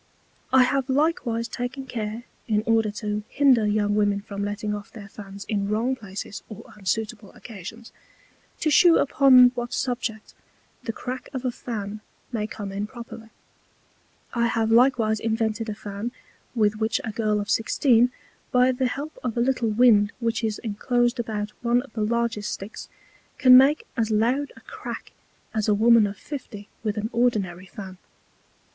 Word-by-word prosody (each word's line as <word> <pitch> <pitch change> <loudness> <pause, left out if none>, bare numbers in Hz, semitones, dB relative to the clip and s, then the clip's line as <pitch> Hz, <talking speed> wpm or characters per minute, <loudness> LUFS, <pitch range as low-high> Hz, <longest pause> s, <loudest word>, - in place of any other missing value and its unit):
I 260 -1 +7
have 270 +1 0
likewise 260 -5 +1
taken 250 +3 -5
care 225 -2 -4 0.2
(in 215 -2 +1
order 225 -1 +3
to 210 0 -3
hinder 255 -7 +4
young 205 0 +1
Women 205 -1 +2
from 200 0 -5
letting 205 +1 -3
off 205 0 -6
their 210 -3 -10
Fans 200 0 -10
in 200 -2 -1
wrong 230 +5 +1
Places 200 -3 -7
or 215 - -11
unsuitable 210 +1 -3
Occasions) 225 +2 -10 0.7
to 310 - +2
shew 340 +2 +7
upon 260 -3 +6
what 240 -1 -5
Subject 245 -4 -3 0.5
the 225 - -3
Crack 255 +3 -6
of 260 0 -4
a 250 - +1
Fan 215 -3 -6 0.3
may 215 -3 -2
come 205 -3 -6
in 200 +2 -3
properly: 230 -1 -10 1.0
I 235 -1 +2
have 225 -1 0
likewise 230 -3 +4
invented 225 0 -1
a 210 - -3
Fan, 205 +2 -5 0.4
with 215 -2 +2
which 220 0 0
a 220 - -3
Girl 215 -1 0
of 205 - -3
Sixteen, 240 +1 +3 0.4
by 250 0 +4
the 255 0 0
help 290 +5 -6
of 245 -2 -3
a - - +2
little 240 -2 +1
Wind 215 -2 +4
which 230 -1 -1
is 220 -2 -1
inclosed 240 +3 0
about 215 -2 -3
one 240 +1 +2
of 275 - -17
the 220 - -3
largest 230 -1 -1
Sticks, 200 +3 -7 0.5
can 255 -3 +8
make 275 +4 +6
as 225 -1 0
loud 240 +7 +1
a - - -14
Crack 450 -4 -8 0.4
as 215 -2 -1
a 210 - +4
Woman 225 0 +5
of 200 0 -7
Fifty 220 -8 -8
with 215 -1 -2
an 215 +3 -2
ordinary 200 -7 0
Fan. 190 -1 -9
225 Hz, 165 wpm, -25 LUFS, 210-245 Hz, 1.0 s, can